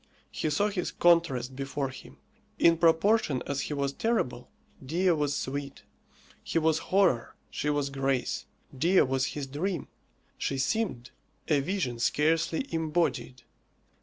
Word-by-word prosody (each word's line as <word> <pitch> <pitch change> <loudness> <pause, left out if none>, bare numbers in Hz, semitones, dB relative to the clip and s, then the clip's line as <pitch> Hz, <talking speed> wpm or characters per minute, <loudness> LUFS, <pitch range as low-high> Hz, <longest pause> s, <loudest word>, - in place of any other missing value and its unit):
He 155 - -2
saw 200 +8 +1
his 190 -3 -2
contrast 160 -8 +2
before 135 0 -3
him: 130 - -12 0.4
in 165 -1 +4
proportion 165 - +3
as 140 -1 -2
he 150 - -3
was 140 -1 -1
terrible, 140 - -1 0.3
Dea 175 +7 +1
was 150 -3 0
sweet. 140 +1 -5 0.6
He - - -2
was 160 -1 +2
horror; 185 -12 +2 0.2
she 150 - -2
was 145 -1 0
grace. 135 -2 -1 0.3
Dea 170 +8 +4
was 130 0 +1
his 145 - -3
dream. 165 +8 -3 0.5
She 135 - -1
seemed 135 - -1 0.4
a 150 -3 +4
vision 140 -6 -2
scarcely 160 - +1
embodied. 160 -6 -1
150 Hz, 135 wpm, -28 LUFS, 135-170 Hz, 0.6 s, in